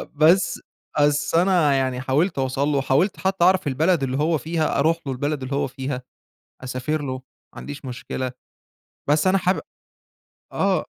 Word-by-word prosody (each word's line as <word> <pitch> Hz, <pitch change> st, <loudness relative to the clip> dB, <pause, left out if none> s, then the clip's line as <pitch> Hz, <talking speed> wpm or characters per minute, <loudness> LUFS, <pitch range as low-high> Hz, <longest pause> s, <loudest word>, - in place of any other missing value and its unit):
بس، 165 Hz, +6 st, +4 dB, 0.4 s
بس 145 Hz, +2 st, +2 dB
أنا 170 Hz, -5 st, +4 dB
يعني 130 Hz, -1 st, 0 dB
حاولت 145 Hz, +6 st, +1 dB
أوصَل 135 Hz, +2 st, 0 dB
له، 145 Hz, -2 st, +1 dB
وحاولت 135 Hz, +8 st, +1 dB
حتّى 190 Hz, -2 st, 0 dB
أعرف 185 Hz, -4 st, +3 dB
البلد 155 Hz, +3 st, +2 dB
اللي 130 Hz, 0 st, -1 dB
هو 155 Hz, +2 st, +2 dB
فيها، 160 Hz, -2 st, -1 dB
أروح 160 Hz, +3 st, +3 dB
له 135 Hz, -, -2 dB
البلد 145 Hz, +1 st, -2 dB
اللي 135 Hz, +2 st, -3 dB
هو 140 Hz, -, 0 dB
فيها، 130 Hz, -1 st, -5 dB, 0.6 s
أسافر 130 Hz, +4 st, -2 dB
له 130 Hz, -2 st, -3 dB
ما 130 Hz, -, -8 dB, 0.4 s
عنديش 145 Hz, -1 st, -8 dB
مشكلة، 130 Hz, 0 st, -4 dB, 0.8 s
بس 155 Hz, +5 st, +3 dB
أنا 195 Hz, +1 st, +4 dB
حابب 185 Hz, +1 st, +1 dB, 0.9 s
آه، -, -, +1 dB
145 Hz, 160 wpm, -23 LUFS, 130-165 Hz, 0.9 s, بس